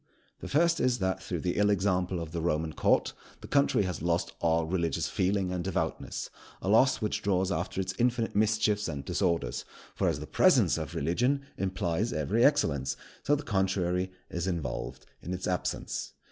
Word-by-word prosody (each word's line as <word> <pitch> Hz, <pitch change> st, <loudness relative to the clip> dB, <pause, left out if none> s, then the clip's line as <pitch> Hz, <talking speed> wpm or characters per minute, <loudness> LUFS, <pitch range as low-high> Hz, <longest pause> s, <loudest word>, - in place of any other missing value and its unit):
The -, -, -7 dB
first 170 Hz, +3 st, +3 dB
is, 125 Hz, -1 st, +2 dB
that, 95 Hz, -2 st, -1 dB
through 90 Hz, -3 st, -4 dB
the 90 Hz, +2 st, -1 dB
ill 105 Hz, 0 st, +4 dB
example 95 Hz, -2 st, +1 dB
of 85 Hz, -1 st, -6 dB
the 85 Hz, 0 st, -3 dB
Roman 80 Hz, -1 st, 0 dB
Court, -, -, +2 dB, 0.3 s
the -, -, -9 dB
country 140 Hz, -7 st, +3 dB
has 90 Hz, -5 st, -3 dB
lost 85 Hz, +2 st, 0 dB
all 80 Hz, 0 st, +2 dB
religious 85 Hz, -2 st, -1 dB
feeling 95 Hz, 0 st, 0 dB
and 90 Hz, -1 st, -2 dB
devoutness, 95 Hz, -1 st, -3 dB, 0.3 s
a 95 Hz, -, -3 dB
loss 125 Hz, +6 st, +4 dB
which 105 Hz, -, -1 dB
draws 95 Hz, -1 st, +1 dB
after 90 Hz, +1 st, -2 dB
it 95 Hz, 0 st, -1 dB
infinite 120 Hz, -1 st, +1 dB
mischiefs 105 Hz, 0 st, +2 dB
and 70 Hz, -2 st, -5 dB
disorders; 85 Hz, -9 st, 0 dB, 0.3 s
for -, -, 0 dB
as -, -, 0 dB
the -, -, -6 dB
presence -, -, +4 dB
of -, -, -6 dB
religion 125 Hz, +11 st, +1 dB
implies 95 Hz, +3 st, -1 dB
every 95 Hz, -, +1 dB
excellence, 70 Hz, -, +2 dB, 0.2 s
so 145 Hz, -, +2 dB
the 145 Hz, -, -5 dB
contrary 95 Hz, -3 st, 0 dB, 0.2 s
is 85 Hz, +1 st, -3 dB
involved 80 Hz, -9 st, -4 dB, 0.2 s
in 90 Hz, -, -4 dB
its 90 Hz, -, -5 dB
absence. 90 Hz, -2 st, -2 dB
95 Hz, 175 wpm, -29 LUFS, 85-105 Hz, 0.3 s, ill